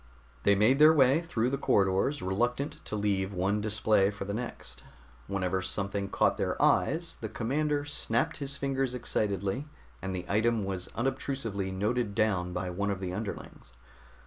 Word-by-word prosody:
They 100 Hz, -, +4 dB
made 110 Hz, +7 st, +4 dB
their 155 Hz, +1 st, +8 dB
way 135 Hz, +2 st, +5 dB
through 125 Hz, -8 st, -1 dB
the 135 Hz, -, -1 dB
corridors, 100 Hz, +7 st, +2 dB
reluctant 125 Hz, +10 st, -1 dB
to -, -, -4 dB
leave 100 Hz, -2 st, 0 dB
one 100 Hz, +3 st, +1 dB
display 105 Hz, -2 st, +2 dB
for 100 Hz, -1 st, -6 dB
the 100 Hz, -, -3 dB
next. 120 Hz, +2 st, -6 dB, 0.5 s
Whenever 95 Hz, -1 st, -1 dB
something 100 Hz, +1 st, -2 dB
caught -, -, +2 dB
their -, -, -1 dB
eyes, 165 Hz, +3 st, +2 dB
the 110 Hz, -, -4 dB
commander 145 Hz, +6 st, -1 dB
snapped 130 Hz, -4 st, -1 dB
his 140 Hz, -1 st, -3 dB
fingers 135 Hz, -2 st, -1 dB
excitedly, 105 Hz, -, -1 dB, 0.3 s
and 95 Hz, 0 st, -3 dB
the 90 Hz, -1 st, -4 dB
item 110 Hz, 0 st, +1 dB
was 95 Hz, -2 st, -4 dB
unobtrusively 120 Hz, -6 st, -2 dB
noted 105 Hz, +2 st, -1 dB
down 95 Hz, -5 st, +1 dB
by 90 Hz, +1 st, -3 dB
one 100 Hz, +3 st, -1 dB
of 100 Hz, -2 st, -2 dB
the 90 Hz, -2 st, -4 dB
underlings. 100 Hz, -, -7 dB
105 Hz, 160 wpm, -29 LUFS, 95-130 Hz, 0.5 s, their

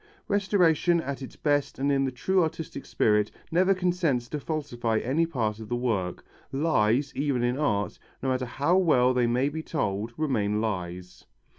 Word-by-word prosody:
Restoration 180 Hz, -4 st, +3 dB
at 140 Hz, -3 st, -4 dB
its 130 Hz, -, -8 dB
best 145 Hz, -2 st, 0 dB
and 140 Hz, +1 st, +1 dB
in 135 Hz, -1 st, +2 dB
the 130 Hz, -, -1 dB
true 185 Hz, +10 st, +1 dB
artistic 160 Hz, -3 st, -4 dB
spirit 105 Hz, -1 st, +2 dB, 0.2 s
never 185 Hz, +3 st, +3 dB
consents 175 Hz, -9 st, 0 dB
to 150 Hz, -, -3 dB
falsify 125 Hz, -7 st, -2 dB
any 145 Hz, +9 st, +1 dB
part 110 Hz, -9 st, -2 dB
of 110 Hz, -1 st, -9 dB
the 120 Hz, -, 0 dB
work. 110 Hz, -8 st, -2 dB, 0.3 s
Lies, 135 Hz, -2 st, +1 dB
even 140 Hz, -4 st, 0 dB
in 120 Hz, +1 st, +1 dB
art, 105 Hz, -9 st, -1 dB, 0.2 s
no 135 Hz, -, 0 dB
matter 130 Hz, -1 st, -1 dB
how 145 Hz, +9 st, +1 dB
well 130 Hz, -9 st, +4 dB
they 125 Hz, -1 st, +2 dB
may 125 Hz, +3 st, +2 dB
be 155 Hz, +2 st, -3 dB
told, 110 Hz, -9 st, -2 dB
remain 110 Hz, -9 st, 0 dB
lies. 90 Hz, -4 st, -4 dB
135 Hz, 170 wpm, -27 LUFS, 115-160 Hz, 0.3 s, well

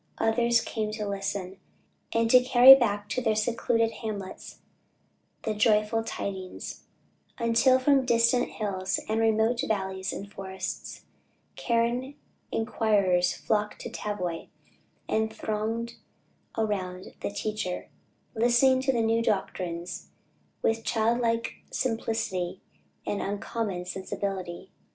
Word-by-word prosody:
Others 235 Hz, +1 st, +3 dB
came 215 Hz, -2 st, -3 dB
to 215 Hz, -1 st, -3 dB
listen, 195 Hz, -1 st, -3 dB, 0.5 s
and 230 Hz, 0 st, +2 dB
to 255 Hz, -, +8 dB
carry 255 Hz, +1 st, +10 dB
back 205 Hz, -6 st, +1 dB
to 255 Hz, -, -1 dB
their 220 Hz, -3 st, +1 dB
secluded 230 Hz, +1 st, +1 dB
hamlets 205 Hz, -5 st, -6 dB, 0.9 s
the 220 Hz, -, -1 dB
joyful 215 Hz, +1 st, +2 dB
tidings; 190 Hz, -4 st, -6 dB, 0.5 s
until 235 Hz, +2 st, +4 dB
"from 270 Hz, +1 st, +3 dB
distant 235 Hz, 0 st, +3 dB
hills 190 Hz, -3 st, -2 dB
and 220 Hz, +1 st, 0 dB
remote 225 Hz, +2 st, +2 dB
valleys 190 Hz, -2 st, -2 dB
and 200 Hz, +1 st, -7 dB
forests, 190 Hz, -1 st, -6 dB, 0.5 s
Karen 240 Hz, +3 st, 0 dB, 0.4 s
inquirers 200 Hz, -6 st, +2 dB
flocked 210 Hz, -1 st, -1 dB
to -, -, -6 dB
Tavoy, 180 Hz, -5 st, -4 dB, 0.6 s
and 220 Hz, 0 st, 0 dB
thronged 220 Hz, +2 st, -3 dB, 0.6 s
around 190 Hz, -4 st, -2 dB
the -, -, -2 dB
teacher;" 205 Hz, -2 st, -4 dB, 0.4 s
listening 245 Hz, +3 st, +4 dB
to 265 Hz, 0 st, +2 dB
the 235 Hz, -3 st, +1 dB
new 225 Hz, +1 st, +2 dB
doctrines 180 Hz, -5 st, -2 dB, 0.5 s
with 225 Hz, 0 st, +1 dB
childlike 230 Hz, +1 st, 0 dB
simplicity 220 Hz, -7 st, -2 dB, 0.5 s
and 205 Hz, -, -2 dB
uncommon 200 Hz, -2 st, -3 dB
sensibility. 190 Hz, -1 st, -5 dB
220 Hz, 110 wpm, -28 LUFS, 195-230 Hz, 0.9 s, carry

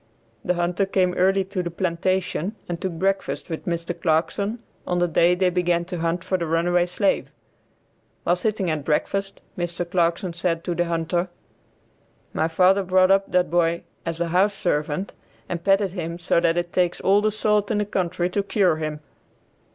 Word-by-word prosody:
The 180 Hz, -, 0 dB
hunter 175 Hz, +3 st, 0 dB
came 185 Hz, -2 st, +1 dB
early 190 Hz, +2 st, +3 dB
to 190 Hz, 0 st, -3 dB
the 175 Hz, -, -3 dB
plantation 185 Hz, +2 st, -1 dB
and 170 Hz, -1 st, -4 dB
took 185 Hz, -2 st, -2 dB
breakfast 195 Hz, +1 st, -2 dB
with 160 Hz, -, -5 dB
Mr. 170 Hz, 0 st, -2 dB
Clarkson 180 Hz, +7 st, 0 dB, 0.3 s
on 180 Hz, -, 0 dB
the 175 Hz, 0 st, +2 dB
day 170 Hz, +1 st, +3 dB
they 180 Hz, 0 st, +2 dB
began 175 Hz, -1 st, +1 dB
to 180 Hz, -1 st, -5 dB
hunt 170 Hz, +1 st, -1 dB
for 185 Hz, -, -1 dB
the 170 Hz, -, -2 dB
runaway 175 Hz, +2 st, +2 dB
slave. 195 Hz, +3 st, 0 dB, 0.9 s
While 175 Hz, -, +3 dB
sitting 195 Hz, -2 st, -1 dB
at 155 Hz, -2 st, -2 dB
breakfast, 195 Hz, +6 st, -1 dB
Mr. 175 Hz, 0 st, -3 dB
Clarkson 170 Hz, 0 st, 0 dB
said 165 Hz, -1 st, -1 dB
to 175 Hz, -, -2 dB
the 175 Hz, +1 st, 0 dB
hunter, 170 Hz, +2 st, -1 dB, 1.0 s
"My 160 Hz, -, +1 dB
father 185 Hz, +4 st, +4 dB
brought 185 Hz, 0 st, +3 dB
up 195 Hz, 0 st, +2 dB
that 180 Hz, -2 st, +2 dB
boy 170 Hz, -1 st, +1 dB, 0.2 s
as 165 Hz, -1 st, -4 dB
a 170 Hz, -1 st, -1 dB
house 195 Hz, +4 st, +2 dB
servant, 150 Hz, +1 st, -1 dB, 0.3 s
and 170 Hz, -1 st, -4 dB
petted 195 Hz, -1 st, +3 dB
him 170 Hz, -2 st, -4 dB
so 170 Hz, -1 st, +1 dB
that 170 Hz, 0 st, +2 dB
it 175 Hz, 0 st, -2 dB
takes 180 Hz, -1 st, +1 dB
all 200 Hz, +2 st, +3 dB
the 215 Hz, -, +2 dB
salt 210 Hz, -1 st, +1 dB
in 220 Hz, -, +1 dB
the 210 Hz, -, +1 dB
country 180 Hz, -3 st, -1 dB
to 200 Hz, -, +1 dB
cure 195 Hz, -4 st, +2 dB
him. 155 Hz, -1 st, -4 dB
175 Hz, 180 wpm, -23 LUFS, 170-190 Hz, 1.0 s, father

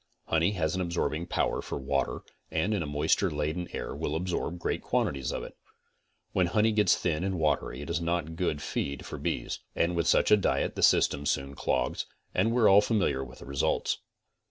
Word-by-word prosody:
Honey 80 Hz, +5 st, +2 dB
has 80 Hz, -5 st, 0 dB
an 95 Hz, -, -1 dB
absorbing 85 Hz, -1 st, -1 dB
power -, -, 0 dB
for -, -, -5 dB
water 70 Hz, 0 st, -1 dB, 0.3 s
and 105 Hz, -, 0 dB
in 100 Hz, -, 0 dB
a 75 Hz, -, -3 dB
moisture 75 Hz, +6 st, +2 dB
laden 80 Hz, +3 st, -2 dB
air -, -, -4 dB
will 75 Hz, -, -3 dB
absorb 90 Hz, 0 st, -2 dB
great 85 Hz, -, -2 dB
quantities 65 Hz, -2 st, 0 dB
of -, -, -3 dB
it. -, -, -9 dB, 0.8 s
When 90 Hz, -2 st, +2 dB
honey 105 Hz, +5 st, +3 dB
gets 105 Hz, -1 st, +4 dB
thin 85 Hz, -1 st, -1 dB
and 95 Hz, -1 st, -1 dB
watery 75 Hz, -4 st, 0 dB
it 75 Hz, -, -7 dB
is 85 Hz, 0 st, 0 dB
not 85 Hz, -1 st, -1 dB
good 75 Hz, -4 st, -1 dB
feed 70 Hz, -1 st, -3 dB
for -, -, -6 dB
bees, -, -, -2 dB, 0.2 s
and 85 Hz, +1 st, +1 dB
with 85 Hz, 0 st, 0 dB
such -, -, +4 dB
a 105 Hz, -, +8 dB
diet 100 Hz, -, 0 dB
the -, -, -4 dB
system 70 Hz, +1 st, +4 dB
soon 70 Hz, 0 st, -1 dB
clogs, -, -, -1 dB, 0.3 s
and 105 Hz, +5 st, +2 dB
we 120 Hz, -, +1 dB
are -, -, +8 dB
all 100 Hz, +1 st, +8 dB
familiar 100 Hz, -, +1 dB
with 65 Hz, 0 st, -11 dB
the -, -, -11 dB
results. 70 Hz, 0 st, 0 dB
85 Hz, 205 wpm, -29 LUFS, 75-95 Hz, 0.8 s, a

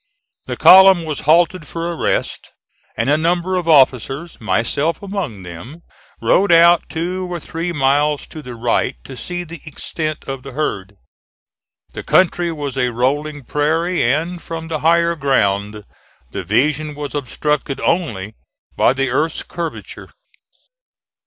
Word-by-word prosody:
The -, -, -4 dB
column 190 Hz, -2 st, +7 dB
was 155 Hz, -2 st, -4 dB
halted 170 Hz, 0 st, +3 dB
for 170 Hz, +1 st, -4 dB
a -, -, -5 dB
rest, -, -, -2 dB, 0.4 s
and 115 Hz, +2 st, 0 dB
a 150 Hz, +2 st, +3 dB
number 175 Hz, +3 st, 0 dB
of 180 Hz, -2 st, -2 dB
officers, 135 Hz, +1 st, +2 dB
myself 115 Hz, -, -1 dB
among 185 Hz, -, -5 dB
them, 90 Hz, -, -10 dB, 0.4 s
rode 195 Hz, -1 st, +3 dB
out 170 Hz, 0 st, +5 dB
two 180 Hz, +3 st, -3 dB
or 175 Hz, -, -3 dB
three 165 Hz, +3 st, -4 dB
miles 145 Hz, 0 st, +1 dB
to 155 Hz, -, -8 dB
the 125 Hz, -4 st, -9 dB
right 120 Hz, +2 st, 0 dB
to 135 Hz, -, -10 dB
see 175 Hz, +6 st, -5 dB
the 170 Hz, -1 st, -10 dB
extent 155 Hz, 0 st, -5 dB
of 135 Hz, -1 st, -6 dB
the 135 Hz, 0 st, -10 dB
herd. 105 Hz, -9 st, -3 dB, 1.0 s
The -, -, -6 dB
country 175 Hz, -1 st, +2 dB
was 145 Hz, -4 st, -5 dB
a 125 Hz, -1 st, +2 dB
rolling 145 Hz, +5 st, -1 dB
prairie, 160 Hz, +6 st, 0 dB
and, 165 Hz, +8 st, 0 dB
from 165 Hz, 0 st, -7 dB
the 155 Hz, -2 st, -2 dB
higher 170 Hz, +2 st, +3 dB
ground, 105 Hz, -7 st, 0 dB, 0.5 s
the -, -, -5 dB
vision 150 Hz, +2 st, 0 dB
was 145 Hz, -1 st, -6 dB
obstructed 145 Hz, 0 st, -2 dB
only 110 Hz, -, -1 dB, 0.4 s
by -, -, +3 dB
the 135 Hz, -1 st, -1 dB
earth's 155 Hz, +5 st, -1 dB
curvature. 170 Hz, -2 st, -7 dB
155 Hz, 145 wpm, -18 LUFS, 135-170 Hz, 1.0 s, column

